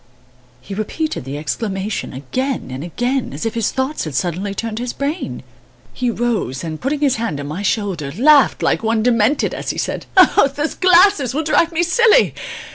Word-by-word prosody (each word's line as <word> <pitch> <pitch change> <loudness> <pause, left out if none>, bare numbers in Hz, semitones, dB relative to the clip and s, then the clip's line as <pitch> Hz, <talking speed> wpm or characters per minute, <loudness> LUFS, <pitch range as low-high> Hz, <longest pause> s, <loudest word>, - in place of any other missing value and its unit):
He 165 - -8
repeated 215 - -3
the 135 +2 -5
exclamation 195 +6 -3
again 255 - -3
and 130 +3 -5
again, 245 - -2
as 145 - -5
if 225 - -1
his 230 -2 0
thoughts 265 - -2
had 155 -4 -6
suddenly 185 +5 -2
turned 225 0 -4
his 245 0 -3
brain. 290 +5 -4 0.5
He 250 -1 -1
rose 225 - -2
and, 160 -2 -5
putting 285 +2 -1
his 280 -5 +2
hand 200 -11 -3
on 145 - -5
my 155 +7 -5
shoulder, 190 -8 -1
laughed 285 +3 +5
like - - +1
one 225 -1 0
demented 240 +3 +2
as - - -5
he - - -3
said: - - -3 0.5
"Those 295 +2 -2
glasses 365 - +4
will 315 - 0
drive 315 +2 +2
me 335 +1 +1
silly! 460 +7 +4
230 Hz, 180 wpm, -18 LUFS, 185-290 Hz, 0.5 s, laughed